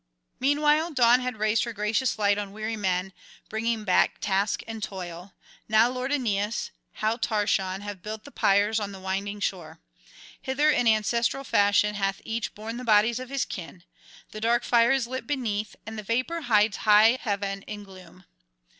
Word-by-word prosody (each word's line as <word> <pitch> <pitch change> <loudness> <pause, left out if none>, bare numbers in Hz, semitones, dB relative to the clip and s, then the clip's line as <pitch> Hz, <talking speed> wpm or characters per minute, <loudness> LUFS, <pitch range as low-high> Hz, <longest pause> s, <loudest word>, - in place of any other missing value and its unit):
Meanwhile 300 +4 +2
Dawn 245 -2 +5
had 250 -3 -4
raised 215 +1 +1
her 235 - -4
gracious 220 +5 0
light 205 -1 +2
on 200 -1 -6
weary 215 +1 -4
men, 190 -2 -1 0.4
bringing 225 0 -1
back 185 -3 +3
task 200 0 0
and 225 -1 -7
toil: 180 -2 -7 0.3
now 220 +2 +5
lord 255 +2 -3
Aeneas, 220 -6 -1 0.3
now 220 +2 +1
Tarchon, 200 -4 0
have 205 -2 -7
built 215 +2 -6
the 285 - -12
pyres 205 +1 +2
on 200 -1 -5
the 190 - -9
winding 195 +2 -3
shore. 165 -5 -4 0.6
Hither 290 +3 +2
in 245 - +1
ancestral 230 +4 +1
fashion 205 -3 +3
hath 195 -1 -1
each 225 0 -3
borne 225 +2 -6
the 250 - -6
bodies 220 +1 +3
of 255 -1 -8
his 275 -1 -1
kin; 175 -1 -8 0.5
the 215 - -8
dark 235 +2 +2
fire 235 -1 +4
is 270 -3 +2
lit 260 +2 -6
beneath, 220 -7 -2
and 220 0 -6
the - - -4
vapour 255 +11 -1
hides 215 -5 +2
high 220 +3 +5
heaven 200 -2 -2
in 210 -1 -7
gloom. 185 -2 -15
215 Hz, 170 wpm, -26 LUFS, 200-235 Hz, 0.6 s, Dawn